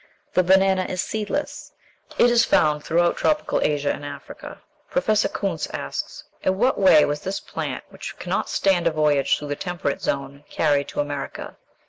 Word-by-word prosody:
The 185 Hz, -, +4 dB
banana 190 Hz, 0 st, +3 dB
is 185 Hz, -, -4 dB
seedless. 220 Hz, +10 st, -3 dB, 0.4 s
It 240 Hz, -, +5 dB
is 235 Hz, -1 st, +5 dB
found 150 Hz, -1 st, +2 dB
throughout 170 Hz, +1 st, +2 dB
tropical 305 Hz, 0 st, +1 dB
Asia 145 Hz, -1 st, +1 dB
and -, -, -8 dB
Africa. 145 Hz, -, -9 dB, 0.3 s
Professor -, -, +1 dB
Kuntze -, -, -3 dB
asks, -, -, -5 dB, 0.2 s
"In 190 Hz, 0 st, 0 dB
what 250 Hz, +5 st, +2 dB
way 185 Hz, -6 st, +6 dB
was 145 Hz, 0 st, -2 dB
this 190 Hz, +1 st, -3 dB
plant, -, -, -5 dB
which -, -, -8 dB
cannot -, -, -2 dB
stand 180 Hz, -3 st, +2 dB
a -, -, +3 dB
voyage 150 Hz, -3 st, +2 dB
through 145 Hz, -, -7 dB
the 145 Hz, -, -1 dB
temperate 175 Hz, -4 st, -3 dB
zone, 140 Hz, +1 st, -3 dB
carried 145 Hz, -3 st, +1 dB
to 140 Hz, -, -2 dB
America?" 145 Hz, -1 st, -5 dB
165 Hz, 165 wpm, -23 LUFS, 145-190 Hz, 0.4 s, way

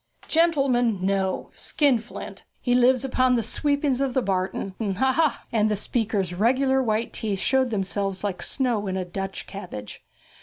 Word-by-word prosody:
'Gentleman! 265 Hz, -, +2 dB
no, 190 Hz, -1 st, -1 dB
skinflint. 250 Hz, -6 st, -1 dB, 0.2 s
He 245 Hz, -, 0 dB
lives 250 Hz, +1 st, +4 dB
upon 255 Hz, -1 st, +2 dB
the 230 Hz, -, +1 dB
sweepings 285 Hz, +2 st, 0 dB
of 270 Hz, -2 st, -1 dB
the 260 Hz, -, +2 dB
barton; 190 Hz, 0 st, -2 dB, 0.2 s
ha, 265 Hz, +3 st, +3 dB
ha!' 320 Hz, -1 st, +1 dB
And 215 Hz, -2 st, +2 dB
the 210 Hz, -, +1 dB
speaker's 205 Hz, -3 st, -1 dB
regular 260 Hz, +7 st, +2 dB
white 225 Hz, -2 st, -1 dB
teeth 210 Hz, -3 st, -2 dB
showed 260 Hz, +6 st, +2 dB
themselves 195 Hz, -2 st, -2 dB
like 195 Hz, -3 st, -2 dB
snow 240 Hz, -7 st, 0 dB
in 190 Hz, 0 st, -2 dB
a 185 Hz, -, -2 dB
Dutch 195 Hz, +2 st, -5 dB
cabbage. 175 Hz, -, -8 dB
230 Hz, 155 wpm, -25 LUFS, 195-260 Hz, 0.2 s, lives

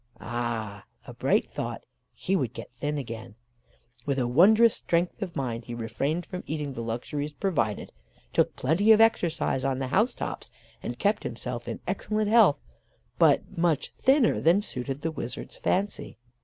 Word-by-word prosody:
Ah! 115 Hz, -4 st, -4 dB, 0.2 s
a -, -, -9 dB
bright -, -, +2 dB
thought, -, -, -5 dB, 0.3 s
he 190 Hz, -, -2 dB
would 130 Hz, -, -1 dB
get -, -, -9 dB
thin 145 Hz, +5 st, -3 dB
again. 115 Hz, -4 st, -7 dB, 0.7 s
With 140 Hz, 0 st, -1 dB
a 125 Hz, -2 st, +1 dB
wondrous 215 Hz, -, +6 dB
strength 175 Hz, +4 st, -1 dB
of 185 Hz, -4 st, -4 dB
mind 120 Hz, -4 st, -3 dB
he 120 Hz, -, -6 dB
refrained 135 Hz, +9 st, -2 dB
from 180 Hz, -1 st, -6 dB
eating 150 Hz, -3 st, -3 dB
the 115 Hz, -, -5 dB
luxuries 135 Hz, +6 st, -4 dB
provided, 145 Hz, -, -1 dB, 0.4 s
took -, -, +2 dB
plenty 170 Hz, +11 st, +3 dB
of 215 Hz, -, +4 dB
exercise 170 Hz, -11 st, +2 dB
on 135 Hz, -1 st, 0 dB
the 130 Hz, -1 st, -3 dB
house 220 Hz, -, +2 dB
tops, -, -, -5 dB, 0.3 s
and -, -, -5 dB
kept -, -, +1 dB
himself -, -, -5 dB
in -, -, -5 dB
excellent 215 Hz, -1 st, -1 dB
health, 220 Hz, -10 st, +6 dB, 0.6 s
but -, -, +3 dB
much 165 Hz, -3 st, 0 dB
thinner 265 Hz, -2 st, +3 dB
than 170 Hz, +5 st, +5 dB
suited 135 Hz, -3 st, -4 dB
the 165 Hz, -, 0 dB
wizard's 125 Hz, -6 st, -6 dB
fancy. 195 Hz, -, -1 dB
145 Hz, 160 wpm, -27 LUFS, 120-185 Hz, 0.7 s, wondrous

